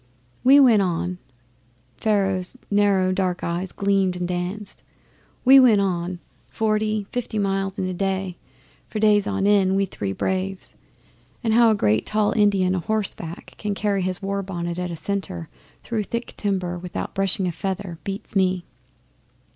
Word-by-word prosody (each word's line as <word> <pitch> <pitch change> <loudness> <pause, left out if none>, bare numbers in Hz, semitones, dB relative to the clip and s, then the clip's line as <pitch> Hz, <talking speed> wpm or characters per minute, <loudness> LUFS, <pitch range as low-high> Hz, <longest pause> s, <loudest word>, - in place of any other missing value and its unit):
'We 275 +3 +7
went 235 -6 +6
on.' 180 0 -1 0.8
Pharaoh's 195 -1 0
narrow 200 -2 +3
dark 185 -1 -1
eyes 175 +2 -2
gleamed 195 -2 +1
and 180 0 -2
danced. 180 +4 -4 0.6
'We 270 +2 +9
went 235 -6 +6
on 180 -2 -1 0.3
forty, 215 -1 0
fifty 245 -3 -3
miles 195 -1 -1
a 185 -2 -2
day, 190 -1 -2 0.5
for - - -6
days 210 -1 +3
on 200 -1 0
end 195 -2 +4
we 195 0 +2
three 100 - -4
braves. 190 - -3 0.7
And 225 -2 +1
how 235 0 +6
a 220 - +3
great 110 - +1
tall 215 -1 +1
Indian 200 -4 +3
a 185 - 0
horse 215 +2 0
back 165 -1 -9
can 205 -1 -2
carry 200 -1 0
his 185 +1 -2
war 200 0 -1
bonnet 175 -2 -4
at 180 0 -2
a 170 - -4
canter 180 - -4 0.4
through 220 -3 -2
thick 235 +3 -4
timber 185 -4 -2
without 180 0 -5
brushing 195 0 0
a 180 - 0
feather 190 -1 -4
beats 200 +2 -6
me! 185 -2 +1
195 Hz, 155 wpm, -23 LUFS, 180-210 Hz, 0.8 s, We